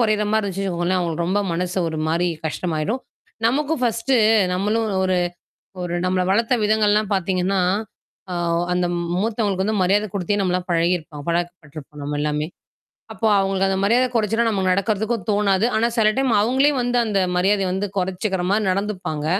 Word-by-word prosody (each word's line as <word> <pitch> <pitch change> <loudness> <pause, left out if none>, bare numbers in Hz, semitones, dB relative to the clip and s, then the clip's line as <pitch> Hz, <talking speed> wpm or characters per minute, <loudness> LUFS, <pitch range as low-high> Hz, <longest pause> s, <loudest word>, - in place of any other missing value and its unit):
கொறையிற 215 -2 +2
மாரி 220 0 +2
இருந்துச்சுவச்சுக்கோங்களேன், 185 -2 -1
அவங்களுக்கு 170 -1 -2
ரொம்ப 195 +3 +1
மனசு 180 +2 -2
ஒரு 160 -1 -4
மாரி 175 +2 +1 0.2
கஷ்டமாயிரும். 165 +8 -2 0.5
நமக்கும் 295 +4 0
ஃபர்ஸ்ட்டு 235 +2 +1 0.4
நம்மளும் 210 +4 0 0.2
ஒரு 185 -1 +1 0.7
ஒரு 175 - -4
நம்மள 185 0 +1
வளர்த்த 230 +4 +2
விதங்கள்லாம் 210 -1 +2
பார்த்தீங்கன்னா, 190 0 0 0.7
அ - - -2 0.4
அந்த 180 0 +1 0.3
மூத்தவங்களுக்கு 210 -3 0
வந்து 215 -3 0
மரியாத 205 +3 +2
குடுத்தே 200 +1 -1
நம்மலாம் 180 -1 -1
பழகியிருப்போ 170 -2 0
பழக்கப்பட்டுருப்போம் 160 -4 -5
நம்ம 145 +1 -3
எல்லாமே. 150 0 -1 0.7
அப்போ 225 - -3
அவங்களுக்கு 195 0 +1
அந்த 190 - 0
மரியாத 235 +5 +3
கொறச்சுலா 225 +1 +1
நமக்கு 190 -3 +1
நடக்கிறதுக்கும் 210 +2 0
தோணாது. 200 0 +2
ஆனா 225 +2 +2
சில 220 -2 +4
டைம் 265 -2 +1
அவங்களே 265 +6 +3
வந்து 245 0 0
அந்த 210 -3 0 0.2
மரியாதைய 195 +1 +2
வந்து 195 +2 -1
கொறச்சுக்கிற 190 +1 -1
மாரி 215 +1 +2
நடந்துப்பாங்க. 185 -6 -3
195 Hz, 150 wpm, -21 LUFS, 180-215 Hz, 0.7 s, சில